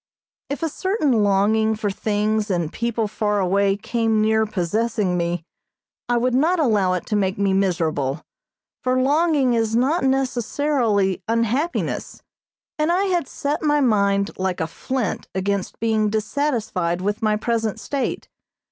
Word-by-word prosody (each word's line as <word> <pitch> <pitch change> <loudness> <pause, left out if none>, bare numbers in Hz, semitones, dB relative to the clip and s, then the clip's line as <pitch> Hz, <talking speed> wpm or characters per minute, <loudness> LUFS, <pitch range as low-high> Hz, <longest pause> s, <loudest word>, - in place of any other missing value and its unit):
If 285 +4 -4
a 325 - +1
certain 300 - +1
longing 215 +2 +2
for 210 -1 -2
things 210 +1 -1
and 170 -4 -1
people 235 -2 -1
far 210 0 -1
away 195 +1 +2
came 225 +1 0
near 220 0 +2
possessing 210 +1 -1
me, 170 -1 -2 0.6
I 240 - +3
would 250 +1 +1
not 325 +8 +2
allow 210 -10 +2
it 180 - -3
to 210 - -2
make 190 -2 0
me 200 -1 +1
miserable, 165 -7 0 0.6
for 255 0 +1
longing 285 -1 +2
is 225 -1 +1
not 270 +8 +2
necessarily 250 - +1
unhappiness, 230 +9 -1 0.6
and 305 +2 +2
I 365 +3 +2
had 345 -5 0
set 285 +1 -3
my 295 -1 +2
mind 200 -5 +2
like 185 -1 -1
a 160 - 0
flint 245 +7 -3
against 195 0 -2
being 220 -1 +1
dissatisfied 215 - -1
with 205 +3 -2
my 215 -1 +2
present 225 -1 -1
state. 280 -2 -3
220 Hz, 145 wpm, -22 LUFS, 195-255 Hz, 0.6 s, I